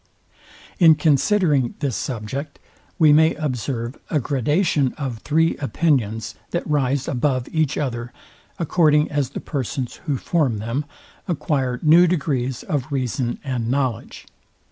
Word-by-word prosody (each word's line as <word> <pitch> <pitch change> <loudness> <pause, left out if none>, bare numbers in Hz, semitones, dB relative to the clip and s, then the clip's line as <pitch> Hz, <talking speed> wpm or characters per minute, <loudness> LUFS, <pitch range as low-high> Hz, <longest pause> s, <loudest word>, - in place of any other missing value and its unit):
In 165 -3 +7
considering 150 - +2
this 140 -6 -2
subject 130 +7 -4 0.4
we 155 -3 +6
may 160 +2 +4
observe 125 -4 -3
a 155 - +1
gradation 145 - +1
of 130 -6 -4
three 160 +6 +1
opinions, 135 -7 0 0.2
that 175 - -2
rise 140 -3 0
above 130 -1 0
each 155 -3 0
other, 120 -4 -3 0.5
according 155 -3 +2
as 145 -4 0
the - - -6
persons, 130 -3 -4
who 140 -3 +1
form 140 -7 0
them, 115 +7 -3 0.4
acquire 140 -7 -1
new 165 +3 +6
degrees 135 -7 -1
of 140 -1 -3
reason 125 -2 -1
and 125 -4 -2
knowledge. 130 -4 -2
140 Hz, 125 wpm, -22 LUFS, 125-155 Hz, 0.5 s, In